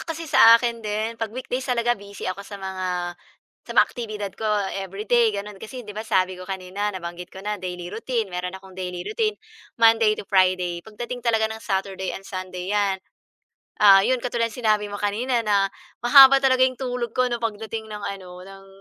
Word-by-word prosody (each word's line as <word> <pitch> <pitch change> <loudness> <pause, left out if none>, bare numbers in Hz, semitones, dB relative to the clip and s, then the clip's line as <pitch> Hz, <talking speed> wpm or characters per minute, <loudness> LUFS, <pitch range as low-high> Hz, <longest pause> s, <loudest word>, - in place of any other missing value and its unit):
kasi 330 0 -5
sa 230 -7 +8
akin 235 -1 -2
din 215 +1 -2
'pag 225 - -1
weekdays 255 +2 -5
talaga 240 -1 +2
busy 200 -2 -8
ako 185 +1 -3
sa 200 0 -9
mga 190 -1 -5 0.7
sa - - -15
mga - - +8
aktibidad 210 -4 -6
ko 220 - -3 0.3
everyday 210 +5 +1
gano'n, 200 -1 -7
kasi 245 +2 -8
'di 210 - -8
ba 215 - -5
sabi 185 -4 0
ko 185 - -10
kanina 190 +2 -3
nabanggit 175 -2 -6
ko 190 +1 -11
na 210 -1 -3
daily 180 -1 -6
routine 225 -4 -2
meron 180 +1 -4
akong 190 0 -14
daily 180 -1 -5
routine. 430 -1 -1 0.4
Monday 225 -2 +5
to - - -7
Friday 185 -3 +2
pagdating 240 +5 -7
talaga 225 -2 +2
ng 220 0 -4
Saturday 190 -2 -3
and 195 - -11
Sunday 185 0 -5
'yan, 200 -2 +1 0.9
ah, 195 -2 +9
'yon 255 -1 +1
katulad 235 -2 0
sinabi 215 -4 +1
mo - - -3
kanina 235 +4 0
na 200 -2 +2 0.4
mahaba 275 +2 +9
talaga 260 -1 +5
'yong 255 0 -1
tulog 245 -3 -3
ko 255 0 +3
ng 240 -1 -3
pagdating 220 0 -4
ng 210 -1 -7
ano, 180 -2 -8
ng 195 0 -13
210 Hz, 190 wpm, -23 LUFS, 190-235 Hz, 0.9 s, ah